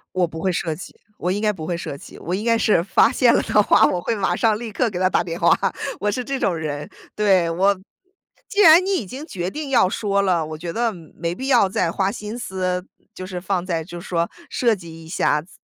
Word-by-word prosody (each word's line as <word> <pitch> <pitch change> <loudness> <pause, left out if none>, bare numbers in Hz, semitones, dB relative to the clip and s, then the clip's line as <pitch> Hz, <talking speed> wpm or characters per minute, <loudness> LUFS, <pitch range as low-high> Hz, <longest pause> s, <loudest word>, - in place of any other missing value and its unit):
我 185 -1 +3
不 165 -1 -8
会 190 +3 0
设 165 -2 -1
计， 175 - -10 0.2
我 180 - -2
应 200 +3 -1
该 215 -1 +2
不 160 -6 -7
会 175 - -1
设 145 -4 -5
计。 - - -13
我 175 - -4
应 205 +4 -2
该 230 -1 +3
是 210 -6 +3
发 185 - +3
现 245 -2 +4
了 - - +3
的 210 - +3
话， - - +5
我 180 - +1
会 230 - -1
马 190 -4 0
上、 215 +3 +2
立 225 -1 -6
刻 245 +2 0
给 185 - -6
他 185 0 +2
打 - - +2
电 170 -1 -5
话， 170 - +4 0.5
我 210 +2 0
是 250 +4 -2
这 275 +1 -3
种 185 - +1
人， 150 -2 -4 0.3
对。 190 -5 +3
我 195 +4 +2 0.7
既 415 -2 +1
然 335 0 +8
你 395 - 0
已 255 - -1
经 260 +10 -8
决 180 - -3
定 300 +5 -6
要 190 -8 +4
说 200 -1 0
了， 180 -5 +1
我 155 0 -7
觉 170 +1 -5
得， 230 +1 0
没 170 0 -6
必 265 +5 -5
要 240 -6 +5
再 180 -3 0
花 190 +2 0
心 215 +2 -6
思， 185 -3 -2 0.3
就 185 - -7
是 180 -2 -5
放 185 -1 -1
在 165 -3 -2
就 175 0 -9
说 170 -1 -1 0.2
设 235 -3 +2
计 165 -4 -9
一 - - -13
下 150 -3 +1
怎 170 - -20
185 Hz, 270 characters per minute, -22 LUFS, 170-215 Hz, 0.7 s, 然